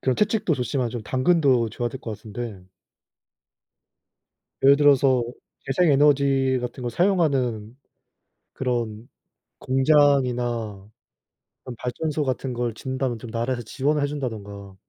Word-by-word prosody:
그런 130 -1 0
채찍도 210 -6 +1
좋지만 125 -1 -2
좀 120 -3 -5
당근도 130 -2 +2
줘야 120 +2 -3
될 130 +3 -9
것 115 - -6
같은데 110 -3 -8 2.0
예를 140 +1 +7
들어서 140 -3 +4 0.4
재생 155 +4 +2
에너지 135 -2 +3
같은 125 +1 -6
걸 120 - -2
사용하는 130 - 0 0.8
그런 120 -3 -3 0.5
공장이나 125 -7 +1 0.8
그런 125 - -8
발전소 150 +5 -2
같은 130 -1 -2
걸 120 -2 -2
짓는다면 130 -1 -3
좀 115 - -9
나라에서 120 +2 -2
지원을 145 +4 -1
해 145 - +1
준다든가 100 -8 -6
130 Hz, 270 characters per minute, -24 LUFS, 120-140 Hz, 2.0 s, 예를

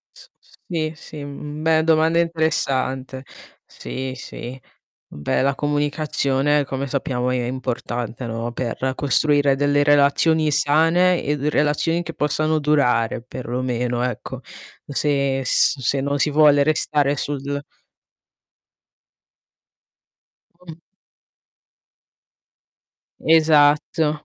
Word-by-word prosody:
S - - -16
s - - -26
sì, 155 -3 -2
sì, 150 -2 -10
mhmm, 145 +1 -8
beh 160 0 +3
domanda 160 +1 +3
interessante, 135 -6 -1 0.4
sì, 130 0 -6
sì. 130 0 -8 0.5
Beh, 75 - -1
la 140 +1 +1
comunicazione 145 -1 0
come 135 0 -4
sappiamo 125 -2 -2
è 125 - 0
è - - -3
importante, 125 -1 -4
no, 115 +1 -4
per 130 +2 -3
costruire 145 0 +2
delle 145 +1 +2
relazioni 145 +2 +3
sane 165 +5 +3
e 145 +1 -1
d 145 +1 -4
relazioni 150 +3 +1
che 165 0 -7
possano 155 +1 0
durare 125 -7 +1
perlomeno, 125 -1 -3
ecco. 125 -3 -5 0.5
Se 140 -1 0
s 135 +2 +2
se 135 +2 0
non 140 +1 -1
si 150 - +1
vuole 145 -1 +5
restare 145 -1 +1
sul 140 0 -3 3.0
Con 170 -2 -12 2.4
Esatto. 155 -1 +3
145 Hz, 105 wpm, -21 LUFS, 130-155 Hz, 3.0 s, vuole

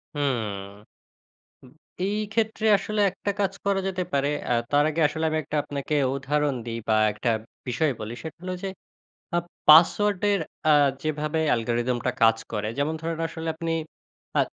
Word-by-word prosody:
হুম। 105 -7 -3 1.2
এই 200 +3 0 0.2
ক্ষেত্রে 220 -1 0
আসলে 215 +2 -2
একটা 200 +2 -3
কাজ 195 -1 +1
করা 195 -1 +2
যেতে 185 -1 -2
পারে। 140 0 +2 0.2
আ - - +4 0.2
তার 145 +1 +4
আগে 165 +2 -2
আসলে 160 0 -3
আমি 155 - 0
একটা 150 +2 -4
আপনাকে 145 +1 -4 0.2
উদাহরণ 145 +1 0
দিই 115 0 -3
বা 110 - +4 0.2
একটা 115 +3 -1 0.4
বিষয় 135 +4 +1
বলি 110 +2 -5
সেটা 160 0 -8
হলো 185 0 -3
যে 195 - -2 0.7
আ - - +3 0.3
পাসওয়ার্ডের 200 +5 +6 0.3
আ - - +7 0.3
যেভাবে 155 +1 -1
অ্যালগরিদম 120 +1 +1
টা 125 - +2
কাজ 115 0 +6
করে 105 -1 -2
যেমন 145 +3 0
ধরেন 165 0 -3
আসলে 165 0 -6
আপনি 165 0 -3 0.7
আ - - +5
150 Hz, 155 wpm, -25 LUFS, 125-180 Hz, 1.2 s, আ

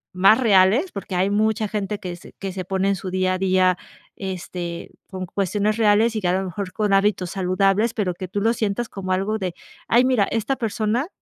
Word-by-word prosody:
más 195 +5 +6
reales 220 - +4
porque, 195 -2 -6
hay 185 +2 +2
mucha 215 +1 +1
gente 205 0 -3
que 180 -2 -5
se - - -15
que 195 -1 -4
se 185 -1 -5
pone 190 +1 0
en 200 - +2
su 185 +1 -6
día 185 0 +1
a 185 - -1
día, 185 -1 +3 0.4
este, 180 -2 -6 0.2
con 185 -1 -5
cuestiones 205 +3 0
reales 220 +1 +3
y 215 - -1
que 180 - 0
a - - +2
lo 190 - -3
mejor 185 +1 -5
con 210 -1 0
hábitos 195 -2 +2
saludables, 195 +4 +1
pero 195 -5 0
que 185 +1 -6
tú 195 +3 -3
lo 225 +2 +3
sientas 220 +1 -2
como 190 -1 -5
algo 200 +4 -1
de 180 -3 -3 0.3
ay, 240 +2 +4
mira, 255 -6 +3
esta 225 +4 0
persona 225 +4 -1
195 Hz, 215 wpm, -22 LUFS, 185-215 Hz, 0.4 s, más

